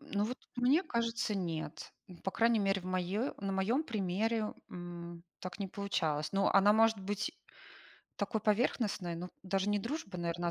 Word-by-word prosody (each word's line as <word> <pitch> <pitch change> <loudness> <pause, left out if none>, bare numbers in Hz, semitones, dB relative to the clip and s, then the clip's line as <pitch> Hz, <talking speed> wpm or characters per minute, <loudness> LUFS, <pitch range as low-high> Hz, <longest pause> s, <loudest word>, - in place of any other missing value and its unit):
Ну 205 0 -1
вот 250 +3 -3 0.2
мне 265 +8 +4
кажется, 230 - 0
нет. 165 -5 -3 0.2
Ну 180 -2 -11
по 195 - -2
крайней 230 +1 +3
мере, 195 -1 +2
в - - -14
моё 185 +7 0
на 195 0 -2
моём 225 +11 +2
примере, 215 - 0 0.2
м, 175 -1 -7 0.2
так 185 +2 -6
не 195 - -1
получалось. 160 -7 -1
Но 195 0 +3
она 200 +1 +7
может 225 -1 +5
быть 205 +2 -2 0.8
такой 210 +2 -1
поверхностной, 210 -4 +1
но 180 +2 -5
даже 195 +1 0
не 205 - +3
дружба, 230 - -4
наверно, 170 0 -1
а - - +1
195 Hz, 170 wpm, -34 LUFS, 180-225 Hz, 0.8 s, она